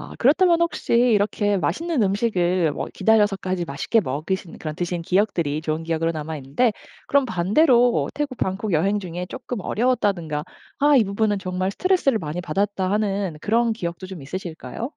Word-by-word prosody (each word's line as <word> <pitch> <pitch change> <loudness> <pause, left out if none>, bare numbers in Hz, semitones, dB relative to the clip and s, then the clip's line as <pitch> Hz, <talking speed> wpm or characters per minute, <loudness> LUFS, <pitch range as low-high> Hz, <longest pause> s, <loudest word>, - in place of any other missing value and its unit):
아 - - -9
그렇다면 335 +6 +4
혹시 340 -7 -1
이렇게 210 -3 +3
맛있는 320 - 0
음식을 185 -5 +1
뭐 - - -4
기다려서까지 195 -5 +2
맛있게 160 +10 0
먹으신 165 +5 -4
그런 155 0 -5
드신 175 -1 -2
기억들이 170 -5 0
좋은 155 0 -2
기억으로 165 0 -1
남아있는데 155 - -1 0.4
그럼 280 -1 +3
반대로 240 - +3
태국 285 -3 -3
방콕 190 +1 -2
여행 195 +6 +2
중에 180 0 -5
쪼끔 250 -2 -6
어려웠다든가 195 -11 0 0.3
아 290 +1 +5
이 250 - +6
부분은 205 +1 0
정말 185 +1 -2
스트레스를 360 - +2
많이 155 0 -4
받았다 190 +3 -1
하는 200 -4 -1
그런 230 +4 +2
기억도 175 -3 -5
좀 185 -6 -9
있으실까요? 165 - -6
195 Hz, 395 characters per minute, -23 LUFS, 170-230 Hz, 0.4 s, 이